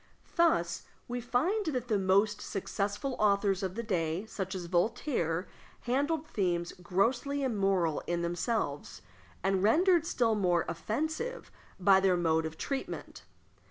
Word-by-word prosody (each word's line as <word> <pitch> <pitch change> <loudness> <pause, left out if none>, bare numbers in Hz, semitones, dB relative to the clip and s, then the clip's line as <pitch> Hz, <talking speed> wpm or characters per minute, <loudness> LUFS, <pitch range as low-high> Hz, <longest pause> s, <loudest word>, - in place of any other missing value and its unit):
Thus 170 - +2 0.2
we 245 0 -3
find 325 - 0
that 250 -5 -1
the 215 -4 +1
most 200 +2 +2
successful 205 +6 -3
authors 200 -2 +2
of 190 -1 -3
the 235 - -3
day, 175 -2 -1
such 190 -3 -4
as 180 -2 -4
Voltaire, 180 - 0 0.3
handled 285 +5 0
themes 175 - -1
grossly 240 +10 0
immoral 195 - +1
in 170 0 -1
themselves, 170 - -2 0.4
and 190 0 +2
rendered 330 - +4
still 235 -9 +2
more 180 -5 +2
offensive 315 - -3 0.3
by 190 +1 +6
their 190 -2 +3
mode 160 -2 +2
of 160 0 -10
treatment. 275 -1 -5
200 Hz, 130 wpm, -31 LUFS, 175-250 Hz, 0.4 s, by